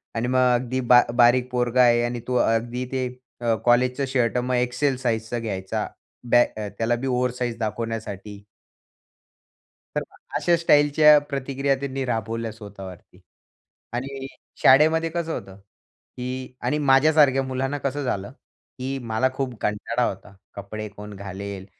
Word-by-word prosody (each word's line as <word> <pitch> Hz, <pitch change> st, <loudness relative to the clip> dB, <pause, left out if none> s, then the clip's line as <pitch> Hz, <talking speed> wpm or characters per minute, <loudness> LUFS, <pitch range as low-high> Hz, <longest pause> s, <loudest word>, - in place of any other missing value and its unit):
आणि 115 Hz, +1 st, -1 dB
मग 130 Hz, 0 st, +2 dB
अगदी 125 Hz, +1 st, -2 dB
बा 125 Hz, 0 st, +9 dB, 0.2 s
बारीक 125 Hz, +1 st, +5 dB
पोरगा 125 Hz, 0 st, +2 dB
आहे 120 Hz, -1 st, +5 dB
आणि 120 Hz, 0 st, -2 dB
तो 125 Hz, -, -1 dB
अगदी 120 Hz, +2 st, -1 dB
ते 130 Hz, -1 st, -1 dB, 0.3 s
अ, 115 Hz, -1 st, +2 dB
कॉलेजचं 125 Hz, +3 st, +3 dB
शर्ट 125 Hz, -2 st, +1 dB
मग 125 Hz, +1 st, 0 dB
एक्सेल 125 Hz, +2 st, 0 dB
साइजचा 120 Hz, -1 st, -2 dB
घ्यायचा 95 Hz, -4 st, -3 dB, 0.4 s
बॅग 120 Hz, -2 st, +4 dB, 0.2 s
त्याला 115 Hz, +1 st, +1 dB
बी 125 Hz, +3 st, -4 dB
ओवर 125 Hz, -1 st, +1 dB
साइज 120 Hz, -2 st, -2 dB
दाखवण्यासाठी 105 Hz, -2 st, -5 dB, 1.5 s
तर -, -, +1 dB, 0.4 s
अशा 175 Hz, -, +3 dB
स्टाईलच्या 150 Hz, -1 st, +5 dB
प्रतिक्रिया 135 Hz, 0 st, -1 dB
त्यांनी 135 Hz, -1 st, -3 dB
राबवल्या 115 Hz, -1 st, -2 dB
स्वतःवरती 100 Hz, -4 st, -11 dB, 0.7 s
आणि 135 Hz, +2 st, -4 dB, 0.4 s
शाळेमध्ये 160 Hz, +4 st, +5 dB
कसं 165 Hz, -1 st, -3 dB
होतं 95 Hz, 0 st, -7 dB, 0.6 s
की 130 Hz, +1 st, -5 dB
आणि 150 Hz, -, 0 dB
माझ्यासारख्या 140 Hz, -1 st, +4 dB
मुलांना 130 Hz, +2 st, -2 dB
कसं 140 Hz, +1 st, -3 dB
झालं, 100 Hz, -4 st, -3 dB
की 135 Hz, -1 st, -8 dB
मला 120 Hz, +1 st, 0 dB
खूप 130 Hz, -2 st, -3 dB
कंटाळा 115 Hz, +3 st, -1 dB
होता 100 Hz, +1 st, -10 dB, 0.2 s
कपडे 105 Hz, +2 st, -6 dB
कोण 105 Hz, +1 st, -10 dB
घालेल? 100 Hz, 0 st, -7 dB
125 Hz, 135 wpm, -24 LUFS, 115-135 Hz, 1.5 s, बा